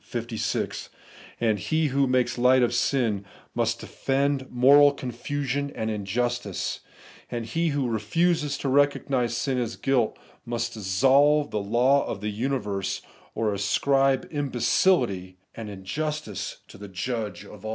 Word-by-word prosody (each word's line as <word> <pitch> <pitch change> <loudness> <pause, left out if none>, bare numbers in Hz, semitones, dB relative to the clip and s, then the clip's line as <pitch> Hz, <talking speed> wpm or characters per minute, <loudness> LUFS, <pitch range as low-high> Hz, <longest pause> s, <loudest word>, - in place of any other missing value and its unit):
56); 115 -2 -3 0.5
and 110 -3 +1
he 155 +7 0
who 135 +1 +2
makes 125 -1 +1
light 125 +1 +5
of 120 - +1
sin 120 -5 +1 0.3
must - - 0
defend 135 0 -1
ifcoral 140 +3 +6
confusion 140 +3 -3
and 110 0 -2
injustice; 110 +1 -2 0.5
he 120 +8 -2
who 145 -4 0
refuses 150 +7 0
to - - -4
recognise 135 -3 +2
sin 130 0 0
as 120 -2 -3
guUt, 130 -5 +1 0.3
must 120 -1 -3
dissolve 135 +9 +3
the 105 - -1
law 125 +7 +3
of 100 - -4
the 105 +1 -3
universe, 105 -5 -2 0.3
or 110 -2 0
ascribe 135 +7 +2
imbecility 125 - +1 0.2
and 110 -2 -7
in 95 -2 -9
justice 150 - -4
to - - -14
the 100 - -8
Judge 110 +3 -4
of 105 -1 -13
aU. 110 - -4
125 Hz, 135 wpm, -26 LUFS, 110-140 Hz, 0.5 s, ifcoral